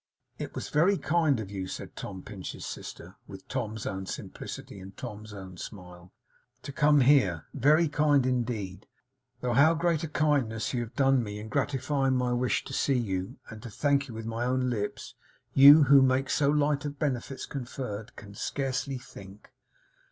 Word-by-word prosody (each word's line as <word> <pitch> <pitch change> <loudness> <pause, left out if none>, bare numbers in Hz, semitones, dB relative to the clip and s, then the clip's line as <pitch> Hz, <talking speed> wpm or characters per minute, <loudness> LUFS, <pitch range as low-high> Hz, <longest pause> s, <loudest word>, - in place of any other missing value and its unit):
'It - - -6
was - - -5
very 180 +7 +3
kind 155 -7 +2
of 100 -3 -6
you,' 95 -2 -4
said - - -7
Tom 95 -2 -7
Pinch's 100 -3 -7
sister, - - -8
with 95 -1 -11
Tom's 110 -5 -4
own 95 0 -4
simplicity 100 - -7
and 95 +1 -12
Tom's 105 +1 -8
own 95 -3 -9
smile, 90 -2 -10 0.5
'to - - -6
come 150 0 +4
here; 125 - +4
very 150 +5 +4
kind 145 -3 +3
indeed; 115 -7 -2 0.5
though 125 -1 0
how 150 +7 +5
great 165 -1 +1
a - - -2
kindness 140 -8 0
you 120 - 0
have 115 -1 -7
done 135 -2 +3
me 105 -2 -5
in 105 +1 -8
gratifying 135 +2 0
my 125 -1 +1
wish 125 +1 0
to - - -8
see 135 -2 +1
you, 95 -5 -3
and 110 0 -9
to 120 - -8
thank 140 +5 +1
you 115 - -9
with 110 0 -6
my 115 +1 -3
own 125 0 0
lips, 105 -3 -4 0.4
you, 145 +3 +9
who 140 0 +7
make 130 +1 +2
so 140 -1 +2
light 145 0 +2
of 145 -1 -5
benefits 135 -2 -3
conferred, 120 -4 -6
can 100 -1 -11
scarcely 135 +4 -2
think. 100 -4 -13
125 Hz, 175 wpm, -28 LUFS, 105-140 Hz, 0.5 s, you